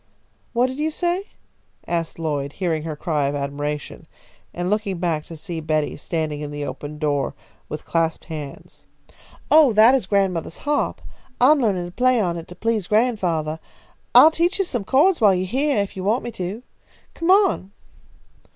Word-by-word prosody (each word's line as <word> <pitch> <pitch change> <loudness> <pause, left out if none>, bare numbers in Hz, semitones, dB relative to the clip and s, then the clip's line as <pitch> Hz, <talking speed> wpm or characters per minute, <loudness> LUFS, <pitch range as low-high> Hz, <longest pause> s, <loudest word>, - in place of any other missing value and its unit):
"What 240 +1 +3
did 260 +2 -4
you 310 +1 +1
say?" 350 +4 -1 0.6
asked 165 -1 -2
Lloyd, 145 -4 -2
hearing 170 -4 -1
her 155 -1 -5
cry 150 -2 -1
of 140 - -2
admiration, 145 +1 -4 0.4
and 175 0 -3
looking 205 -2 -1
back 165 -3 -1
to 165 - -9
see 165 +1 -5
Betty 155 -1 -1
standing 155 -1 -3
in 150 - -4
the 145 0 -5
open 145 +1 -7
door 145 -2 -1 0.3
with 150 - -6
clasped 165 -1 -1
hands. 150 -4 -9 0.6
"Oh, 300 -6 +7
that 220 +4 +7
is 260 -8 +1
grandmothah's 190 -5 0
harp. 295 0 0 0.4
I 255 +4 +6
am 305 -2 +4
learning 195 -6 +1
to 175 - -8
play 250 +4 +2
on 175 -5 0
it 165 - -8
to 175 - -11
please 220 -3 -1
grandfathah. 185 -9 +1 0.6
I'll 315 - +9
teach 340 +4 +1
you 390 - +1
some 240 - -2
chords 310 - +3
while 200 -3 +6
you 180 - -1
are - - -3
heah, 260 +1 +1
if 200 - -9
you 185 - -5
want 220 +6 +1
me 240 - -5
to. 195 +4 -5 0.5
Come 335 +1 -3
on." 380 - +4
185 Hz, 180 wpm, -22 LUFS, 155-245 Hz, 0.6 s, I'll